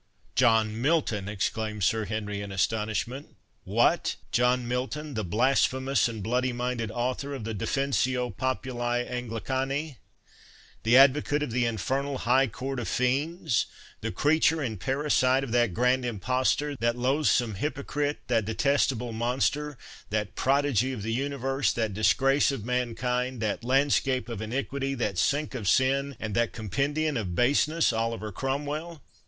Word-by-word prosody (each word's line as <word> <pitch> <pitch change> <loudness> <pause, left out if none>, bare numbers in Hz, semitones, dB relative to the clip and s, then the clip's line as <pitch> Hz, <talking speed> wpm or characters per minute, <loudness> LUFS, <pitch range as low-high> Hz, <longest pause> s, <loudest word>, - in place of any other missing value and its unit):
"John 115 -2 +3
Milton!" 125 - +1
exclaimed 105 0 -2
Sir 110 +3 +2
Henry 105 0 -3
in 100 -1 -6
astonishment—"What! 110 +6 -1 0.2
John 125 0 +2
Milton, 135 +5 -3
the 110 - -2
blasphemous 130 +5 +2
and 110 -4 -6
bloody 125 +3 0
minded 120 -2 -2
author 125 +5 -2
of 130 - -6
the 110 +1 -4
Defensio 130 +1 0
Populi 120 -1 -1
Anglicani!—the 125 0 -3
advocate 145 +2 +5
of 150 - -4
the 120 +1 +1
infernal 135 +6 -1
High 130 +2 +3
Court 130 +4 -4
of 120 - -4
Fiends; 135 +2 0 0.3
the 115 - -3
creature 160 +4 +2
and 115 -9 -3
parasite 135 +1 +2
of 130 - -5
that 120 -3 +3
grand 125 +1 +2
impostor, 130 +5 0
that 120 +1 0
loathsome 125 -3 +2
hypocrite, 145 +5 -2
that 115 -4 +1
detestable 125 0 +1
monster, 130 +5 -1 0.3
that 105 -1 -2
prodigy 135 -2 +1
of 105 - -6
the 115 +1 -2
universe, 135 +1 0
that 110 -3 -1
disgrace 135 +8 +3
of 115 -7 -5
mankind, 125 +1 -1
that 110 +2 -2
landscape 130 -1 +2
of 115 -3 -5
iniquity, 135 +4 -2
that 105 -7 -1
sink 145 +6 +1
of 115 -7 -4
sin, 135 +3 +2
and 110 -1 -4
that 115 +2 +1
compendium 140 - -1
of 95 -6 -3
baseness, 145 - +3
Oliver 115 -1 -2
Cromwell!" 145 - -4
125 Hz, 135 wpm, -27 LUFS, 115-135 Hz, 0.3 s, advocate